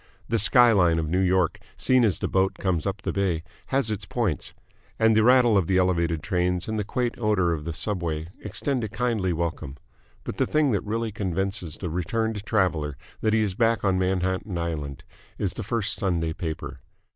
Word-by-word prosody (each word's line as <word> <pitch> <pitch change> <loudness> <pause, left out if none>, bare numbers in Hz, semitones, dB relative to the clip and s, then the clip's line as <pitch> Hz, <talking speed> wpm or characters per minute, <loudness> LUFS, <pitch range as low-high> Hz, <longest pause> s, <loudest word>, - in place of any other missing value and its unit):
The 115 0 +2
sky 120 +3 +7
line 90 -6 +4
of 80 -1 -1
New 90 +4 +1
York, 95 -2 +2 0.2
seen 130 -1 +3
as 105 -5 +2
the - - -2
boat 95 0 +1
comes 90 -4 -1
up 95 0 -4
the - - -1
bay, 90 -5 0 0.2
has 135 -5 0
its 100 -4 -4
points, 105 - -1 0.5
and 110 -1 +4
the 110 - +5
rattle 125 -2 +5
of 85 - -1
the 95 - +2
Elevated 85 -4 +1
trains 90 -2 0
and 110 -1 -2
the - - 0
quaint 120 +4 -2
odour 100 -6 +2
of 75 -2 -5
the 85 - -3
Subway 85 -4 -3
extend 125 +5 -2
a 110 - -3
kindly 110 -4 -1
welcome, 80 -4 -3 0.5
but - - -6
the - - +1
thing 150 -3 +2
that 100 - +1
really 115 +1 -2
convinces 95 -3 -2
the 90 - -4
returned 105 +5 -2
traveller 80 - 0 0.2
that 110 0 +1
he 110 - +3
is 100 -3 -1
back 115 +2 +1
on 95 -2 +2
Manhattan 95 +1 -1
Island 75 -5 -4 0.3
is 100 -3 -1
the - - -6
first 110 0 -2
Sunday 85 -4 0
paper. 80 -2 -5
95 Hz, 195 wpm, -25 LUFS, 85-110 Hz, 0.5 s, sky